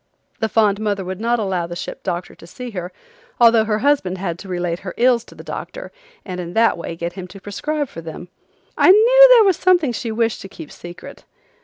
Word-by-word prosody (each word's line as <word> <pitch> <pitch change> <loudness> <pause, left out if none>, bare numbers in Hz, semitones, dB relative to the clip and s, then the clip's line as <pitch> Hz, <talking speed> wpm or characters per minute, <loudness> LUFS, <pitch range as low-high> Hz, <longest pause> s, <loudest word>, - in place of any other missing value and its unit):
The 220 - -1
fond 210 -3 +2
mother 205 -3 -2
would 185 +2 -6
not 235 +1 +1
allow 190 -6 -2
the 175 - -7
ship - - -7
doctor 175 +1 -4
to 165 - -15
see 250 +7 -8
her 180 -3 -6 0.5
although 230 -2 +5
her 210 -1 0
husband 190 -11 +1
had 175 -3 -4
to 200 - -10
relate 175 -2 -3
her 185 - -8
ills 240 -1 +3
to - - -16
the - - -11
doctor - - -7 0.3
and 185 -2 -6
in 175 -1 -6
that 225 +2 +3
way 170 -1 -6
get 170 +1 -5
him 185 0 -8
to 195 +2 -12
prescribe 290 +10 -3
for 165 - -10
them. 165 +2 -9 0.5
I - - +4
knew 485 +6 +8
there 485 -3 +8
was 385 -4 +3
something 355 -7 +3
she 230 0 -4
wished 225 0 -1
to 195 - -9
keep 165 -6 -11
secret. 175 0 -11
205 Hz, 220 wpm, -20 LUFS, 180-240 Hz, 0.5 s, knew